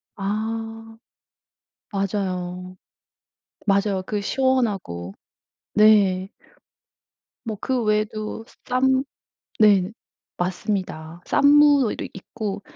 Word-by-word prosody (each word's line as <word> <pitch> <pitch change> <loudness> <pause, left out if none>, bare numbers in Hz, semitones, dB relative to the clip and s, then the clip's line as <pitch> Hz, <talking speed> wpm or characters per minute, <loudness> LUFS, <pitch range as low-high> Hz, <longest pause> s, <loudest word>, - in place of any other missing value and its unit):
아 225 +2 -4 1.0
맞아요. 185 -2 -3 0.9
맞아요 200 -1 +2
그 210 -1 -2
시원하고. 200 - -1 0.6
네. 200 -3 +4 1.2
뭐 220 -3 -4
그 255 -3 -1
외에도 215 +1 -1
스 - - -21
쌈 260 +1 +2 0.6
네. 200 -3 +5 0.5
맞습니다. 180 -3 -3
쌈무도 285 -4 +4
있고 200 +1 -5
210 Hz, 140 characters per minute, -23 LUFS, 190-225 Hz, 1.2 s, 네